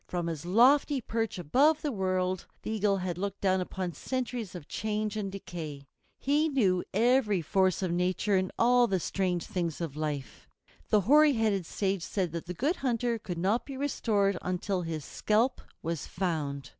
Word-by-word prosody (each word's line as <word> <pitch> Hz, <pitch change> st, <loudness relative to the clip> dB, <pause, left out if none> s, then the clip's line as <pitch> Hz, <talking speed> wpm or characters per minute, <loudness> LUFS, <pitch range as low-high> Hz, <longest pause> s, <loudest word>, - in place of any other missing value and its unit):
From 175 Hz, -1 st, -2 dB
his 165 Hz, -1 st, -4 dB
lofty 265 Hz, -, +5 dB
perch 225 Hz, -3 st, -2 dB
above 275 Hz, -, +3 dB
the 295 Hz, -, 0 dB
world 185 Hz, -3 st, -1 dB, 0.2 s
the -, -, -3 dB
Eagle 205 Hz, -2 st, +1 dB
had 180 Hz, -2 st, -3 dB
looked 200 Hz, 0 st, -3 dB
down 190 Hz, -1 st, +2 dB
upon 180 Hz, -1 st, -4 dB
centuries 245 Hz, -, -4 dB
of 165 Hz, -5 st, -8 dB
change 215 Hz, 0 st, -2 dB
and 200 Hz, -3 st, -3 dB
decay. 160 Hz, -7 st, -7 dB, 0.3 s
He 295 Hz, +3 st, +2 dB
knew 195 Hz, -11 st, +2 dB
every 220 Hz, -4 st, +3 dB
force 190 Hz, +2 st, +2 dB
of 180 Hz, -, 0 dB
nature 180 Hz, +3 st, +1 dB
and 185 Hz, 0 st, +1 dB
all 245 Hz, +1 st, +5 dB
the 190 Hz, -3 st, 0 dB
strange 180 Hz, 0 st, -1 dB
things 170 Hz, -4 st, -3 dB
of 165 Hz, -5 st, -4 dB
life. 150 Hz, -3 st, -5 dB, 0.4 s
The 210 Hz, -2 st, +4 dB
hoary 295 Hz, +8 st, +6 dB
headed 210 Hz, -7 st, 0 dB
sage 195 Hz, -2 st, -1 dB
said 185 Hz, -1 st, -2 dB
that 170 Hz, +1 st, -5 dB
the 180 Hz, -, -5 dB
Good 295 Hz, -, 0 dB
Hunter 240 Hz, -2 st, 0 dB
could 175 Hz, -4 st, -5 dB
not 195 Hz, +7 st, +1 dB
be 275 Hz, -2 st, -8 dB
restored 205 Hz, -8 st, +1 dB
until 185 Hz, +1 st, -1 dB
his 160 Hz, -3 st, -4 dB
scalp 225 Hz, +5 st, +1 dB, 0.2 s
was 165 Hz, -2 st, -3 dB
found. 155 Hz, -7 st, -3 dB
195 Hz, 175 wpm, -29 LUFS, 175-230 Hz, 0.4 s, hoary